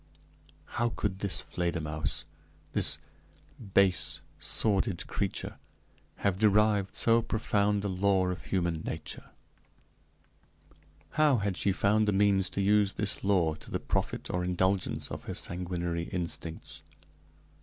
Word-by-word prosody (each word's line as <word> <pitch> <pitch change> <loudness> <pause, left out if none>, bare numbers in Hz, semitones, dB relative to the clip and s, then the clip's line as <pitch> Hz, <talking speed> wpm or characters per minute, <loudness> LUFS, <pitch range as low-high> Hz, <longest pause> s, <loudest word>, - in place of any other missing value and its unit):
How 120 - +3
could 95 -4 -3
this 100 -2 +1
Fledermausse, 80 -4 -2 0.5
this - - +2 0.8
base, 95 -2 +3 0.2
sordid 100 -3 +1
creature, - - -3 0.6
have 95 -2 0
derived 105 -2 +3
so 115 0 +4
profound 105 -2 +1
a - - +1
law 95 -1 +2
of 90 - -5
human 85 -4 0
nature? 80 -1 -6 1.8
how 150 -3 +4
had 100 -3 -1
she 100 - +1
found 105 +3 +2
the 105 - +3
means 95 -1 +3
to 100 - -2
use 100 0 +3
this 105 - -2
law 90 -5 +3
to - - -12
the - - -2
profit - - -2
or 90 0 -1
indulgence 95 +1 0
of - - -6
her - - -4
sanguinary 85 -1 -2
instincts? 85 -2 -6
95 Hz, 125 wpm, -30 LUFS, 90-105 Hz, 1.8 s, so